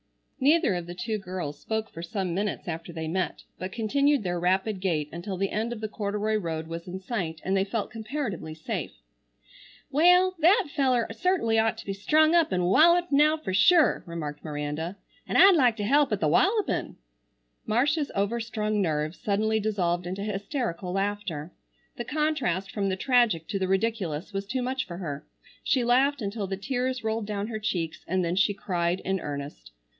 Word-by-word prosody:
Neither 300 Hz, -, +4 dB
of 175 Hz, -1 st, -4 dB
the 175 Hz, -, -7 dB
two 215 Hz, +3 st, -3 dB
girls 180 Hz, -6 st, -5 dB
spoke 220 Hz, 0 st, -3 dB
for 165 Hz, -, -8 dB
some 180 Hz, +1 st, -3 dB
minutes 200 Hz, +2 st, -2 dB
after 165 Hz, 0 st, -5 dB
they 160 Hz, -1 st, -5 dB
met, 185 Hz, +3 st, -2 dB, 0.2 s
but 185 Hz, +1 st, -4 dB
continued 275 Hz, +5 st, +1 dB
their 175 Hz, -2 st, -1 dB
rapid 190 Hz, +3 st, +1 dB
gait, 165 Hz, -6 st, 0 dB
until 180 Hz, +3 st, -5 dB
the 195 Hz, +1 st, -1 dB
end 225 Hz, +3 st, -1 dB
of 240 Hz, -, -5 dB
the 215 Hz, -, -2 dB
corduroy 210 Hz, 0 st, -2 dB
road 165 Hz, -5 st, -3 dB
was 165 Hz, +1 st, -7 dB
in 185 Hz, +1 st, -5 dB
sight 185 Hz, -6 st, -3 dB
and 190 Hz, +1 st, +1 dB
they 190 Hz, -, +3 dB
felt 205 Hz, +1 st, -3 dB
comparatively 220 Hz, -, -4 dB
safe. 155 Hz, -, -4 dB, 1.0 s
"Wal, 360 Hz, +5 st, +5 dB
that 370 Hz, +6 st, +5 dB
feller 255 Hz, -5 st, +2 dB
certainly 230 Hz, -4 st, +1 dB
ought 225 Hz, 0 st, +1 dB
to -, -, -9 dB
be 195 Hz, -, -3 dB
strung 310 Hz, +11 st, +3 dB
up 335 Hz, -2 st, +4 dB
an' 185 Hz, -1 st, +1 dB
walluped, 340 Hz, -, +5 dB
now, 300 Hz, +2 st, +4 dB
fer 245 Hz, -12 st, -5 dB
sure," 315 Hz, -, +5 dB
remarked 155 Hz, -3 st, -5 dB
Miranda, 150 Hz, +4 st, -4 dB, 0.3 s
"an -, -, 0 dB
I'd 390 Hz, -1 st, +8 dB
like 250 Hz, -7 st, +3 dB
to 205 Hz, -, -2 dB
help 280 Hz, +5 st, +3 dB
at 210 Hz, -, 0 dB
the 155 Hz, -, +1 dB
wallupin'." 400 Hz, -, +1 dB, 0.7 s
Marcia's 285 Hz, +7 st, +1 dB
overstrung 215 Hz, 0 st, -1 dB
nerves 155 Hz, -2 st, -1 dB
suddenly 220 Hz, +2 st, +1 dB
dissolved 180 Hz, -5 st, -1 dB
into 190 Hz, +2 st, -4 dB
hysterical 205 Hz, -, -3 dB
laughter. 195 Hz, -5 st, -2 dB, 0.5 s
The 240 Hz, -, -4 dB
contrast 275 Hz, -, -1 dB
from 200 Hz, -2 st, -1 dB
the 190 Hz, -, 0 dB
tragic 225 Hz, -, +2 dB
to 200 Hz, -, -1 dB
the 190 Hz, -, 0 dB
ridiculous 195 Hz, -4 st, -1 dB
was 195 Hz, 0 st, -3 dB
too 255 Hz, +3 st, -2 dB
much 260 Hz, +1 st, -2 dB
for 170 Hz, -, -7 dB
her. 150 Hz, -6 st, -5 dB, 0.4 s
She 255 Hz, -, +2 dB
laughed 260 Hz, +2 st, +3 dB
until 200 Hz, 0 st, -3 dB
the 195 Hz, 0 st, -3 dB
tears 255 Hz, +3 st, -2 dB
rolled 220 Hz, -1 st, -2 dB
down 205 Hz, -1 st, -2 dB
her 220 Hz, -2 st, -4 dB
cheeks, 170 Hz, -7 st, -3 dB
and 185 Hz, 0 st, 0 dB
then 170 Hz, +1 st, -1 dB
she 195 Hz, +1 st, +2 dB
cried 175 Hz, -2 st, -1 dB
in 190 Hz, 0 st, -1 dB
earnest. 140 Hz, -, -6 dB
205 Hz, 185 wpm, -27 LUFS, 175-245 Hz, 1.0 s, I'd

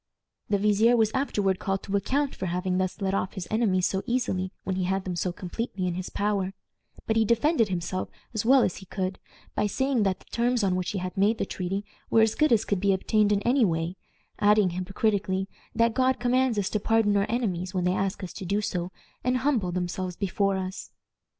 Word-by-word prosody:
The 205 Hz, -, +3 dB
vizier 210 Hz, +4 st, +4 dB
was 220 Hz, -1 st, +3 dB
afterward 205 Hz, -8 st, 0 dB
called 195 Hz, 0 st, -2 dB
to 200 Hz, -, -3 dB
account 270 Hz, +8 st, 0 dB
for 185 Hz, -, -4 dB
having 180 Hz, +1 st, -1 dB
thus 185 Hz, +2 st, -2 dB
let 195 Hz, -1 st, 0 dB
off 195 Hz, -1 st, -1 dB
his 185 Hz, -4 st, -6 dB
enemies 200 Hz, -5 st, +2 dB
so 190 Hz, -, 0 dB
easily 190 Hz, -7 st, -1 dB
when 190 Hz, -, -2 dB
he 185 Hz, -1 st, -1 dB
had 190 Hz, +1 st, 0 dB
them 185 Hz, -2 st, -3 dB
so 180 Hz, +1 st, -1 dB
completely 190 Hz, +2 st, -4 dB
in 180 Hz, -, 0 dB
his 185 Hz, +1 st, -4 dB
power; 200 Hz, -2 st, -1 dB, 0.5 s
but 220 Hz, -, +1 dB
he 225 Hz, -, +5 dB
defended 235 Hz, +3 st, +3 dB
himself 185 Hz, +1 st, -2 dB, 0.2 s
as 220 Hz, -, -1 dB
well 260 Hz, +2 st, +6 dB
as 180 Hz, -, -1 dB
he 190 Hz, -, -11 dB
could 185 Hz, 0 st, -3 dB, 0.3 s
by 210 Hz, -, +1 dB
saying 265 Hz, +3 st, 0 dB
that 195 Hz, -2 st, +1 dB
the -, -, -22 dB
terms 240 Hz, -1 st, +1 dB
on 190 Hz, -2 st, +2 dB
which 185 Hz, -1 st, -1 dB
he 205 Hz, -, -3 dB
had 185 Hz, 0 st, -4 dB
made 205 Hz, +4 st, +3 dB
the -, -, -1 dB
treaty 195 Hz, +2 st, -3 dB, 0.2 s
were 225 Hz, -, +5 dB
as 220 Hz, -1 st, +3 dB
good 305 Hz, -2 st, +2 dB
as 225 Hz, -2 st, +4 dB
could 200 Hz, -, 0 dB
be 200 Hz, +1 st, +3 dB
obtained 210 Hz, +2 st, +2 dB
in 200 Hz, -1 st, +1 dB
any 250 Hz, +2 st, +3 dB
way, 165 Hz, -2 st, 0 dB, 0.4 s
adding, 205 Hz, -2 st, +4 dB
hypocritically, 190 Hz, +1 st, -1 dB, 0.3 s
that 230 Hz, 0 st, +3 dB
"God 260 Hz, +2 st, +2 dB
commands 250 Hz, -1 st, +2 dB
us 205 Hz, 0 st, 0 dB
to 210 Hz, -, 0 dB
pardon 220 Hz, -1 st, +2 dB
our 200 Hz, 0 st, +1 dB
enemies 190 Hz, -6 st, -2 dB
when 180 Hz, -, +1 dB
they 180 Hz, +1 st, +2 dB
ask 195 Hz, +1 st, -2 dB
us 180 Hz, -, -6 dB
to -, -, -7 dB
do 200 Hz, +3 st, +1 dB
so, 180 Hz, -3 st, -2 dB, 0.3 s
and 250 Hz, +1 st, +2 dB
humble 250 Hz, -9 st, +1 dB
themselves 180 Hz, 0 st, -3 dB
before 195 Hz, 0 st, 0 dB
us." 190 Hz, 0 st, -5 dB
200 Hz, 220 wpm, -27 LUFS, 185-225 Hz, 0.5 s, well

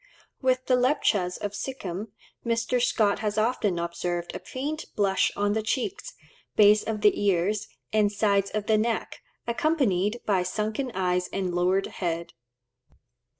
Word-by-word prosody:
With 255 Hz, -1 st, +1 dB
the 255 Hz, -, +3 dB
Lepchas 235 Hz, -8 st, +1 dB
of 205 Hz, -, -4 dB
Sikhim, 205 Hz, -5 st, -5 dB, 0.4 s
Mr. 235 Hz, +1 st, 0 dB
Scott 215 Hz, -4 st, +2 dB
has 210 Hz, -1 st, -2 dB
often 215 Hz, -4 st, +1 dB
observed 170 Hz, 0 st, -3 dB
a -, -, -4 dB
faint 295 Hz, +4 st, -4 dB
blush 195 Hz, -2 st, +2 dB
on 205 Hz, 0 st, +1 dB
the 220 Hz, -, 0 dB
cheeks, 270 Hz, -, -3 dB, 0.4 s
base 210 Hz, 0 st, +6 dB
of 215 Hz, -2 st, -3 dB
the 210 Hz, 0 st, +3 dB
ears, 200 Hz, +2 st, +1 dB, 0.3 s
and 210 Hz, -1 st, +3 dB
sides 200 Hz, -1 st, +2 dB
of 215 Hz, -1 st, -3 dB
the 215 Hz, 0 st, +3 dB
neck, 230 Hz, +1 st, -2 dB, 0.2 s
accompanied 235 Hz, -, +1 dB
by 195 Hz, -3 st, +2 dB
sunken 215 Hz, +7 st, -2 dB
eyes 180 Hz, -1 st, +1 dB
and 185 Hz, -2 st, -2 dB
lowered 180 Hz, +2 st, +2 dB
head. 170 Hz, -2 st, -4 dB
210 Hz, 145 wpm, -26 LUFS, 185-235 Hz, 0.4 s, base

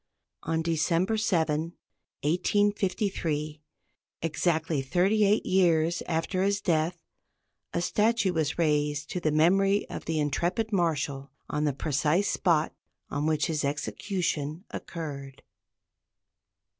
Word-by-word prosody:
On 160 Hz, 0 st, -1 dB
December 170 Hz, +5 st, +1 dB
7, 165 Hz, -6 st, 0 dB, 0.5 s
1853, 180 Hz, -3 st, 0 dB, 0.6 s
exactly 160 Hz, -1 st, 0 dB
thirty 185 Hz, +10 st, +2 dB
eight 205 Hz, +2 st, +2 dB
years 170 Hz, -3 st, +2 dB
after 165 Hz, +2 st, -1 dB
his 200 Hz, +1 st, +2 dB
death, 165 Hz, -1 st, 0 dB, 0.7 s
a 170 Hz, -, -1 dB
statue 210 Hz, -1 st, +2 dB
was 155 Hz, -3 st, -1 dB
raised 150 Hz, -2 st, 0 dB
to 180 Hz, -, -2 dB
the 160 Hz, -, +1 dB
memory 195 Hz, +6 st, +3 dB
of -, -, -6 dB
the 160 Hz, -1 st, -1 dB
intrepid 175 Hz, -, -1 dB
Marshal 145 Hz, -6 st, 0 dB, 0.2 s
on 150 Hz, +1 st, 0 dB
the 145 Hz, -, +1 dB
precise 150 Hz, +7 st, +1 dB
spot 165 Hz, -4 st, +1 dB, 0.4 s
on 145 Hz, +2 st, -1 dB
which 155 Hz, -1 st, +1 dB
his 155 Hz, -2 st, -1 dB
execution 155 Hz, +2 st, -2 dB
occurred. 140 Hz, -5 st, -7 dB
165 Hz, 110 wpm, -28 LUFS, 150-185 Hz, 0.7 s, memory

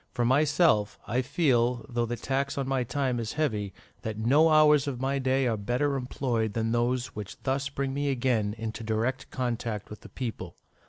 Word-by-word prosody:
For 120 Hz, -, +1 dB
myself, 145 Hz, -, +3 dB
I 120 Hz, +4 st, 0 dB
feel, 125 Hz, -4 st, +1 dB
though 120 Hz, -2 st, -1 dB
the 120 Hz, -, -2 dB
tax 140 Hz, +3 st, -2 dB
on 135 Hz, -1 st, -1 dB
my 135 Hz, -2 st, +1 dB
time 125 Hz, 0 st, -1 dB
is 115 Hz, -2 st, -3 dB
heavy, 110 Hz, -11 st, -1 dB, 0.3 s
that 110 Hz, -1 st, -4 dB
no 140 Hz, +9 st, +4 dB
hours 150 Hz, -2 st, +5 dB
of 130 Hz, -4 st, -3 dB
my 135 Hz, +1 st, 0 dB
day 130 Hz, 0 st, +1 dB
are 115 Hz, -3 st, +1 dB
better 125 Hz, +7 st, 0 dB
employed 125 Hz, -4 st, -1 dB
than 115 Hz, 0 st, -1 dB
those 120 Hz, +2 st, 0 dB
which 105 Hz, -2 st, -7 dB
thus 135 Hz, +1 st, -1 dB
bring 135 Hz, -1 st, -3 dB
me 145 Hz, +1 st, -1 dB
again 120 Hz, -6 st, 0 dB
into 115 Hz, 0 st, -5 dB
direct 115 Hz, +4 st, -1 dB
contact 115 Hz, -5 st, -3 dB
with 105 Hz, -, -9 dB
the -, -, -12 dB
people. 110 Hz, -9 st, -5 dB
125 Hz, 190 wpm, -28 LUFS, 115-135 Hz, 0.3 s, hours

